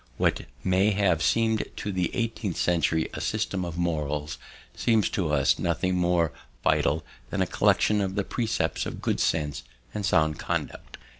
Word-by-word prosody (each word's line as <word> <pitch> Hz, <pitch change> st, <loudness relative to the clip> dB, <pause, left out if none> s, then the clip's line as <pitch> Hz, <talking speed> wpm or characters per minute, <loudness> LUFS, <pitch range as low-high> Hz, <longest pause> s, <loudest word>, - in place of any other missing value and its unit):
What -, -, +2 dB, 0.2 s
may 95 Hz, +3 st, +3 dB
have 95 Hz, -5 st, +2 dB
seemed 110 Hz, -1 st, +2 dB
to 105 Hz, -, -3 dB
the 90 Hz, -2 st, 0 dB
eighteenth 115 Hz, -6 st, -2 dB
century 80 Hz, -2 st, +1 dB
a -, -, -5 dB
system 95 Hz, -2 st, -1 dB
of 85 Hz, -1 st, -5 dB
morals 75 Hz, -4 st, -2 dB, 0.4 s
seems 110 Hz, -4 st, +2 dB
to 85 Hz, -6 st, -1 dB
us 70 Hz, -2 st, +3 dB
nothing 90 Hz, +2 st, 0 dB
more 85 Hz, -3 st, +2 dB, 0.3 s
vital 75 Hz, +2 st, +2 dB, 0.2 s
than -, -, -3 dB
a -, -, 0 dB
collection 105 Hz, -1 st, +3 dB
of 95 Hz, -1 st, -2 dB
the 100 Hz, -, +1 dB
precepts 115 Hz, +2 st, -1 dB
of -, -, -6 dB
good -, -, 0 dB
sense 75 Hz, -3 st, 0 dB, 0.3 s
and 105 Hz, -, -3 dB
sound 80 Hz, -5 st, +2 dB
conduct. -, -, -4 dB
90 Hz, 160 wpm, -27 LUFS, 80-100 Hz, 0.4 s, may